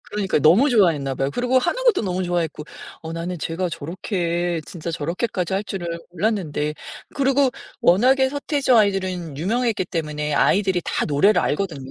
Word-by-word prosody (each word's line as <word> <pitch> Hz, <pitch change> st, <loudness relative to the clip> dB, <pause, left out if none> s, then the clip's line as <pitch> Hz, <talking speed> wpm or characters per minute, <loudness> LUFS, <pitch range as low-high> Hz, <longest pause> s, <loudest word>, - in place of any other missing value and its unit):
그러니까요. 200 Hz, -7 st, -1 dB
너무 195 Hz, -, +6 dB
좋아했나 160 Hz, -, +2 dB
봐요. 135 Hz, +2 st, -1 dB
그리고 250 Hz, -, +1 dB
하는 -, -, -1 dB
것도 445 Hz, -, +4 dB
너무 185 Hz, -1 st, -2 dB
좋아했고 170 Hz, -4 st, -2 dB, 0.4 s
어 160 Hz, 0 st, -6 dB
나는 170 Hz, +1 st, -4 dB
쟤가 170 Hz, +4 st, -2 dB
저렇게 170 Hz, +1 st, -2 dB
진짜 170 Hz, -1 st, -6 dB
저렇게까지 175 Hz, +4 st, -2 dB
할 200 Hz, +2 st, -1 dB
줄은 190 Hz, -4 st, -5 dB, 0.2 s
몰랐는데 170 Hz, -6 st, -1 dB, 0.4 s
그리고 275 Hz, -1 st, +2 dB, 0.3 s
워낙에 260 Hz, +9 st, +4 dB
서태지와 280 Hz, -3 st, +2 dB
아이들은 185 Hz, -6 st, -1 dB
유명했기 215 Hz, -, 0 dB
때문에 150 Hz, -4 st, -3 dB
아이들이 190 Hz, +1 st, +2 dB
다 -, -, -1 dB
노래를 180 Hz, +7 st, +3 dB
알거든요. 145 Hz, -6 st, -2 dB
180 Hz, 410 characters per minute, -22 LUFS, 165-215 Hz, 0.4 s, 너무